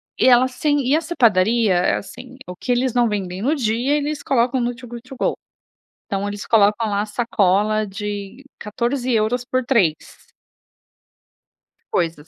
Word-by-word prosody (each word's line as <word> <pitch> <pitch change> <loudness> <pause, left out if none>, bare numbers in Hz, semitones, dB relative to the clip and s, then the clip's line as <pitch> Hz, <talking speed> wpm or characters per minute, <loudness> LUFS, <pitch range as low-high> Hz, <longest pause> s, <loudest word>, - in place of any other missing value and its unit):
e - - +2
ela 255 0 +6
sem 290 +3 0
e 285 - +3
essa 330 +2 -2
padaria, 220 - +3
é 175 +1 +2
assim: 255 +6 -9
o 180 - -7
que 245 - -4
eles 245 0 +1
não 240 -2 +2
vendem 190 -3 -4
no 280 +8 +1
dia, 245 +2 0
eles 295 0 -3
colocam 255 -1 +1
no 240 0 -2
Too 250 0 -12
Good 235 0 -8
To 270 - -8
Go. - - 0 0.7
Então, 200 -1 -2
eles 205 0 -6
colocam 215 0 +3
lá 200 -1 0
a 215 - -5
sacola 215 -1 +1
de 205 +4 -6 0.2
14 240 +4 -2
euros 235 +2 +1
por 255 +1 -1
3. 200 - +2 2.0
Coisas. 165 -3 -1
235 Hz, 165 wpm, -20 LUFS, 205-255 Hz, 2.0 s, ela